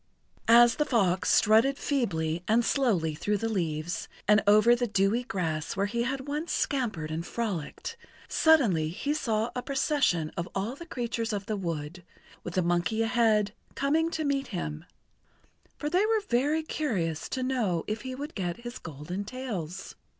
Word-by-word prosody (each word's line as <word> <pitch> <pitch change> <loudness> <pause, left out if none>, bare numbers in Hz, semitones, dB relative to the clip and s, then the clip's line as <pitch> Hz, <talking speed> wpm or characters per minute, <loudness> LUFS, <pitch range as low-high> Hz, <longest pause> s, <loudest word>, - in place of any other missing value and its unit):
As 235 +1 +7
the 300 - +3
fox 195 -10 +1
strutted 225 +6 +4
feebly 170 - -1
and 230 +2 +3
slowly 195 - +1
through 205 +7 -1
the 225 - -2
leaves 170 -5 -2 0.2
and 210 +1 +6
over 215 +3 +6
the 245 0 -1
dewy 200 +3 +2
grass 165 -9 -2
where 200 0 +1
he 235 +3 -1
had 265 +3 -2
once 300 +4 -3
scampered 215 - -1
and 160 +1 -2
frolicked, 215 - -4 0.3
suddenly 225 - +4
he 285 - -2
saw 230 -6 -1
a 250 - -1
procession 265 - +1
of 170 +1 -3
all 205 +6 -2
the 340 +4 -10
creatures 235 -5 -2
of 200 -1 -3
the 215 -1 -2
wood, 170 -2 -4 0.4
with 175 - -6
the 185 - +2
monkey 175 +6 +1
ahead, 225 -3 +2 0.2
coming 315 +4 +1
to 320 -1 -2
meet 280 -2 0
him, 160 -4 -5 0.9
for 295 - -3
they 360 +6 +2
were 445 -1 +2
very 290 +6 +1
curious 190 - -2
to 260 - -2
know 225 -10 0
if 215 0 -3
he 255 0 -5
would 290 +3 -6
get 180 +1 -3
his 240 +1 -7
golden 160 +5 -6
tails. 200 -7 -5
220 Hz, 165 wpm, -28 LUFS, 175-260 Hz, 0.9 s, As